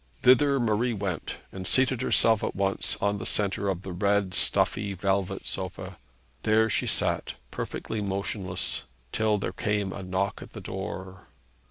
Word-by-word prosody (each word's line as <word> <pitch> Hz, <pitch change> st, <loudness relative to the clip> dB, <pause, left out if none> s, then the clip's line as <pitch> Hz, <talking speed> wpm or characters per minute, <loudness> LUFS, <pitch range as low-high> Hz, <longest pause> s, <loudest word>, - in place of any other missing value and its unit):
Thither 135 Hz, +2 st, +6 dB
Marie 115 Hz, +1 st, +1 dB
went, 95 Hz, -5 st, -3 dB, 0.2 s
and 95 Hz, -2 st, -6 dB
seated 130 Hz, -2 st, +3 dB
herself 115 Hz, -4 st, +4 dB
at -, -, -2 dB
once 95 Hz, 0 st, 0 dB
on 100 Hz, 0 st, +1 dB
the -, -, -5 dB
centre 100 Hz, -1 st, +1 dB
of 95 Hz, -1 st, -2 dB
the 95 Hz, -, -5 dB
red, 100 Hz, 0 st, +1 dB
stuffy, 100 Hz, +2 st, +2 dB
velvet 95 Hz, 0 st, 0 dB
sofa. 95 Hz, -1 st, -4 dB, 0.4 s
There 110 Hz, 0 st, +3 dB
she -, -, +1 dB
sat, -, -, 0 dB, 0.2 s
perfectly 110 Hz, -1 st, -4 dB
motionless, 95 Hz, -2 st, -2 dB, 0.3 s
till 110 Hz, -1 st, +2 dB
there 100 Hz, -, -3 dB
came 105 Hz, -3 st, -1 dB
a -, -, -6 dB
knock 95 Hz, +1 st, -1 dB
at -, -, -11 dB
the -, -, -6 dB
door. 95 Hz, 0 st, -6 dB
100 Hz, 155 wpm, -28 LUFS, 95-110 Hz, 0.4 s, Thither